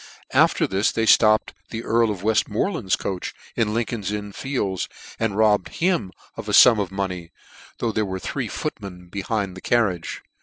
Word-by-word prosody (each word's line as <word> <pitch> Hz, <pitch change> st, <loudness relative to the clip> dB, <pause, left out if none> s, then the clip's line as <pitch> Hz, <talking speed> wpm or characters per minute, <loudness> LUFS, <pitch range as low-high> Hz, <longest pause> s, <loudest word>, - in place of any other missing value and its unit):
After -, -, +4 dB
this 95 Hz, +2 st, +1 dB
they 115 Hz, -, 0 dB
flopped 110 Hz, -1 st, +5 dB, 0.2 s
the 115 Hz, 0 st, -5 dB
Earl 115 Hz, 0 st, +2 dB
of 100 Hz, -3 st, -4 dB
Weftmoreland's 110 Hz, -, +1 dB
coach 95 Hz, -2 st, -4 dB, 0.2 s
in 110 Hz, -2 st, +1 dB
Lincoln's 110 Hz, -3 st, -2 dB
Inn 105 Hz, -1 st, -4 dB
Fields, 100 Hz, -6 st, -2 dB, 0.3 s
and 115 Hz, -3 st, -1 dB
robbed 105 Hz, -3 st, +3 dB
him 170 Hz, -, +1 dB, 0.2 s
of -, -, -7 dB
a -, -, -1 dB
funi 115 Hz, -4 st, +8 dB
of 95 Hz, -, -4 dB
money, 90 Hz, -3 st, -4 dB, 0.5 s
though 115 Hz, -, -1 dB
there 110 Hz, 0 st, 0 dB
were 95 Hz, -2 st, -3 dB
three 95 Hz, -, -3 dB
footmen 90 Hz, -3 st, -6 dB
be 100 Hz, +2 st, -4 dB
hind 100 Hz, -2 st, -2 dB
the 95 Hz, -, -9 dB
carriage. 105 Hz, -8 st, 0 dB
105 Hz, 175 wpm, -23 LUFS, 95-115 Hz, 0.5 s, funi